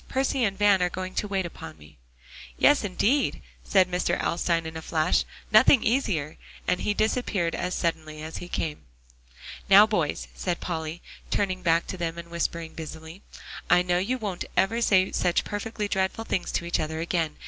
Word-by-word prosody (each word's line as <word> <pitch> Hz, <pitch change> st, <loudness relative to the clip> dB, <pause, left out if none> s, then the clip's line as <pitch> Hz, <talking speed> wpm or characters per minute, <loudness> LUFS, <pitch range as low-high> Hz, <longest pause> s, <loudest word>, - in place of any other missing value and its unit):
Percy 265 Hz, -1 st, 0 dB
and 195 Hz, -2 st, -2 dB
Van 205 Hz, -2 st, +4 dB
are 180 Hz, -, +2 dB
going 185 Hz, +1 st, -5 dB
to 210 Hz, -, -1 dB
wait 195 Hz, -2 st, -1 dB
upon 80 Hz, -, -9 dB
me." 75 Hz, 0 st, -17 dB, 0.6 s
"Yes, 290 Hz, -, +4 dB
indeed," 210 Hz, +8 st, +1 dB, 0.2 s
said 190 Hz, -2 st, +4 dB
Mr. 180 Hz, -1 st, 0 dB
Alstyne 170 Hz, -1 st, 0 dB
in 160 Hz, 0 st, -6 dB
a 160 Hz, -, -5 dB
flash, 155 Hz, -1 st, +1 dB, 0.3 s
"nothing 220 Hz, +3 st, +6 dB
easier;" 185 Hz, -, 0 dB, 0.3 s
and 180 Hz, 0 st, +1 dB
he 205 Hz, -, -1 dB
disappeared 215 Hz, -6 st, 0 dB
as 180 Hz, -, -2 dB
suddenly 155 Hz, -2 st, -2 dB
as 160 Hz, +1 st, -6 dB
he 175 Hz, -, -7 dB
came. 155 Hz, -, -4 dB, 0.8 s
"Now, 200 Hz, +2 st, +9 dB
boys," 175 Hz, -9 st, -1 dB
said 175 Hz, -2 st, -3 dB
Polly, 160 Hz, -1 st, -4 dB, 0.3 s
turning 185 Hz, -2 st, -1 dB
back 170 Hz, -1 st, +2 dB
to 185 Hz, -, -6 dB
them 170 Hz, -1 st, -3 dB
and 170 Hz, 0 st, -9 dB
whispering 170 Hz, -1 st, -3 dB
busily, 160 Hz, +3 st, -9 dB, 0.5 s
"I 180 Hz, 0 st, +5 dB
know 180 Hz, 0 st, +1 dB
you 235 Hz, +8 st, -1 dB
won't 205 Hz, -7 st, -4 dB
ever 230 Hz, +5 st, +2 dB
say 190 Hz, -4 st, +3 dB
such 180 Hz, -1 st, +1 dB
perfectly 210 Hz, 0 st, -4 dB
dreadful 195 Hz, +3 st, -1 dB
things 185 Hz, -, -2 dB
to 170 Hz, -, -1 dB
each 170 Hz, -, 0 dB
other 160 Hz, 0 st, -3 dB
again. 165 Hz, -2 st, -1 dB
180 Hz, 180 wpm, -26 LUFS, 165-205 Hz, 0.8 s, Now